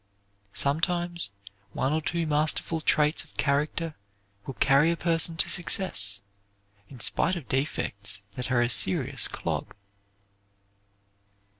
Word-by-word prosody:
Sometimes 170 - -2 0.4
one 135 +3 -1
or 160 - 0
two 170 +2 -2
masterful 155 +1 -1
traits 150 0 +3
of 155 - -22
character 150 +3 -1 0.5
will 135 - -6
carry 140 +3 +3
a 170 - -1
person 165 -1 +2
to - - +3
success, 100 - 0 0.7
in 130 - -13
spite 170 +10 +2
of 165 -7 -8
defects 100 -8 -3
that 125 +5 -5
are 120 -1 +3
a - - +1
serious 95 -4 +5
clog. - - -5
150 Hz, 120 wpm, -26 LUFS, 125-165 Hz, 0.7 s, serious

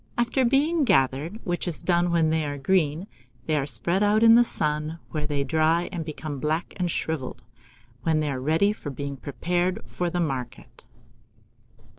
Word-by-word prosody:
After 240 +2 +1
being 290 +6 +3
gathered, 145 - +1
which 175 0 -2
is 170 - -3
done 175 -1 +2
when 165 -2 +2
they 160 0 +1
are 145 -1 -3
green, 155 +2 +1 0.4
they 155 - 0
are 140 -2 0
spread 160 - 0
out 210 +2 +3
in 225 0 +8
the 240 +1 +7
sun, 150 -5 -2
where 150 -2 -2
they 145 -2 -1
dry 160 +4 +1
and 175 -4 -3
become 155 -2 -6
black 155 +5 -2
and 180 -2 0
shrivelled, 135 -7 -3 0.6
when 155 +4 +1
they 150 -2 -1
are 130 -2 -4
ready 160 +9 +2
for 155 - -7
being 140 +1 -5
prepared 175 +6 -1
for 175 -1 -3
the 175 - -2
market. 130 -8 -4
160 Hz, 175 wpm, -25 LUFS, 145-180 Hz, 0.6 s, in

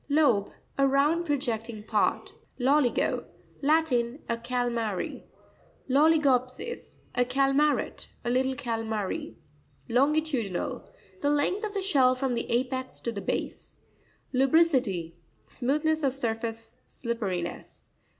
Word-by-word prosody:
Loze.—A 275 -1 +1
round 295 +5 +2
projecting 235 -6 -2
part. 215 -1 0 0.2
Lo'tico.—Latin. 275 0 +1
<A 235 - 0
calmary. 235 -4 -2 0.6
Louico'psis.—A 275 - +1
calmaret; 275 +3 +1 0.2
a 240 - +1
little 260 +1 +1
calmary. 225 - -3 0.5
Lonaitu'pinaL.—The 255 - -1
length 295 +8 +1
of 420 -1 -3
the 395 - -1
shell 265 -9 +4
from 260 -1 -1
the 235 - -2
apex 260 +2 -1
to 235 - -2
the 200 -3 -5
base. - - -4 0.6
Lusri'ciry.—Smoothness 265 - +1
of 275 -3 +1
surface, 225 -3 -4
slipperiness. 200 -8 -4
255 Hz, 90 wpm, -28 LUFS, 230-290 Hz, 0.6 s, shell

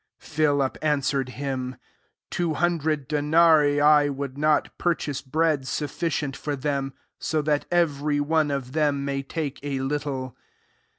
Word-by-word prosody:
7 160 - -15
Philip 145 -3 +2
answered 140 -3 0
him, 130 -1 -4
^^ - - -40 0.5
Two 170 -3 -1
hundred 155 -4 0
denarii 150 -1 +4
would 140 -1 -4
not 150 +1 +1
pur 175 -1 +2
chase 145 -4 -4
bread 150 -1 0
sufficient 150 -1 -2
for 145 -1 -3
them, 140 -1 -2 0.3
so 155 - -1
that 150 -1 0
every 150 -4 +1
one 155 +1 +1
of 135 -3 -3
them 145 -2 +1
may 140 -1 -1
take 145 0 -4
a 140 -1 -3
little." 135 -2 -3
145 Hz, 140 wpm, -25 LUFS, 140-155 Hz, 0.5 s, denarii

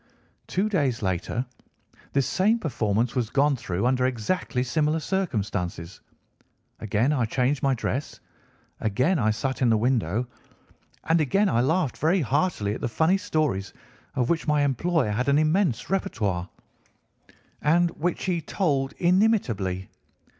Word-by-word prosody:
"Two 195 +3 0
days 140 - 0
later 95 +6 -1 0.7
this 140 -2 +2
same 210 +5 +2
performance 120 - -1
was 120 -4 0
gone 140 +4 +2
through 95 -4 -3
under 125 0 +2
exactly 125 - -1
similar 155 +4 0
circumstances. 105 - -3 0.8
Again 110 +6 +1
I 125 -5 +1
changed 130 +4 0
my 135 -1 +2
dress, 130 +4 -3 0.6
again 130 - +1
I 110 -3 +2
sat 130 +5 -2
in 125 - +4
the 110 - +4
window, 115 -2 0 0.8
and 165 0 +2
again 195 +8 +2
I 120 - +2
laughed 155 +1 0
very 170 +4 +2
heartily 135 - 0
at - - -6
the - - -1
funny 160 - +2
stories 155 - -1 0.4
of 125 -2 +1
which 165 -1 -1
my 150 -1 +3
employer 145 -2 +1
had 125 +6 0
an 140 - +4
immense 155 - +2
répertoire, 100 - -2 1.1
and 170 +3 +3
which 170 +1 -2
he 175 -3 0
told 140 -6 -1
inimitably. 170 - +1
135 Hz, 140 wpm, -25 LUFS, 115-165 Hz, 1.1 s, in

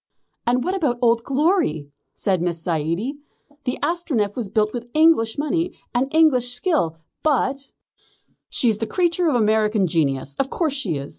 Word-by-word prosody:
"And 245 +1 +2
what 370 - -1
about 295 -11 0
Old 235 -1 +2
Glory?" 275 - 0 0.2
said 185 -4 0
Miss 170 -1 -1
Zaidie. 170 - -2 0.5
"The 250 - -1
Astronef 275 - 0
was 235 -6 -4
built 215 0 +1
with 240 -1 -6
English 310 -8 +4
money 330 +4 -1 0.2
and 260 +3 0
English 265 -7 +3
skill, 245 - 0 0.2
but 275 -2 0 0.4
" - - -36 0.3
"She 245 - +2
is 215 -2 +2
the 225 - -2
creature 350 -1 +1
of 300 - +2
American 215 -2 +2
genius. 140 -5 -1
Of 270 - 0
course 315 -4 -1
she 230 - -1
is. 140 0 -5
245 Hz, 165 wpm, -22 LUFS, 200-300 Hz, 0.5 s, English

